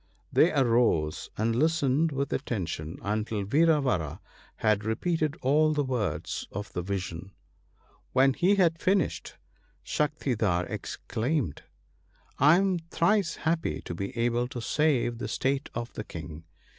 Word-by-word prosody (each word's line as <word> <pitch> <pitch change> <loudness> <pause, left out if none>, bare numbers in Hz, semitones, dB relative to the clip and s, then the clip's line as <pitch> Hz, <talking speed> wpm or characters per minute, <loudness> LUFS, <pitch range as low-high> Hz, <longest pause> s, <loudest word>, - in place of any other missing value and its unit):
They 170 - +5
arose, 115 - +2
and 115 +2 +1
listened 155 +1 +2
with 140 0 -2
attention 85 - -3
until 105 0 -1
Vira 155 +9 +4
vara 90 - -1 0.4
had 105 -1 +1
repeated 155 - -1
all 155 +4 +4
the 150 -1 +1
words 105 - -2
of 105 +1 -6
the 90 - -2
vision. 95 0 -5 0.8
AVhen 135 0 +5
he 190 +3 +3
had 170 -4 +3
finished, 190 -4 0 0.5
Shaktidhar 120 - 0
exclaimed, 120 - -2 0.4
' - - -38 0.2
I 150 +5 +7
am 190 -2 +1
thrice 170 +3 +1
happy 165 0 0
to - - -6
be 100 +6 -5
able 120 +1 +1
to 125 - -6
save 120 -3 +1
the - - -3
state 135 +1 -1
of 120 0 -4
the 110 - -5
King. 80 -3 -9
125 Hz, 135 wpm, -28 LUFS, 100-155 Hz, 0.8 s, I